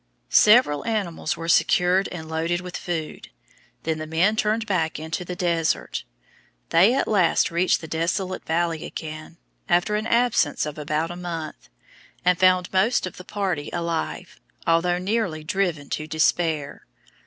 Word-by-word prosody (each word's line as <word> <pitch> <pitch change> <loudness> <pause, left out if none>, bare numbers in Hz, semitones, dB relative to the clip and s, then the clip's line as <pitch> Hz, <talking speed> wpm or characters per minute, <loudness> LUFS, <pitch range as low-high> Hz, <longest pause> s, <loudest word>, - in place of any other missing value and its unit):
Several 210 - +5
animals 195 -8 -2
were 165 - -6
secured 180 +3 +3
and 160 -3 -7
loaded 165 +2 -1
with 180 -1 -8
food. 160 -3 -5 0.5
Then 160 -1 -2
the 155 - -5
men 175 +7 +2
turned 220 +1 0
back 165 -6 -1
into 160 +3 -4
the 180 0 -6
desert. 170 -2 -1 0.6
They 195 +9 +5
at 275 - 0
last 190 -6 +2
reached 175 +2 +2
the 160 - -8
desolate 180 +4 -2
valley 165 -1 -1
again, 155 +1 -8 0.3
after 175 +4 +2
an 215 +2 -1
absence 235 -13 +2
of 150 0 -6
about 155 +3 -1
a - - -6
month, 170 - -6 0.6
and 180 0 +3
found 185 0 +3
most 205 +6 +2
of 185 - -8
the 180 - -9
party 185 -7 -3
alive, 170 +1 -3 0.3
although 170 +2 +2
nearly 185 -4 -1
driven 165 -4 -1
to 155 - -3
despair. 160 -2 0
175 Hz, 150 wpm, -24 LUFS, 160-185 Hz, 0.6 s, Several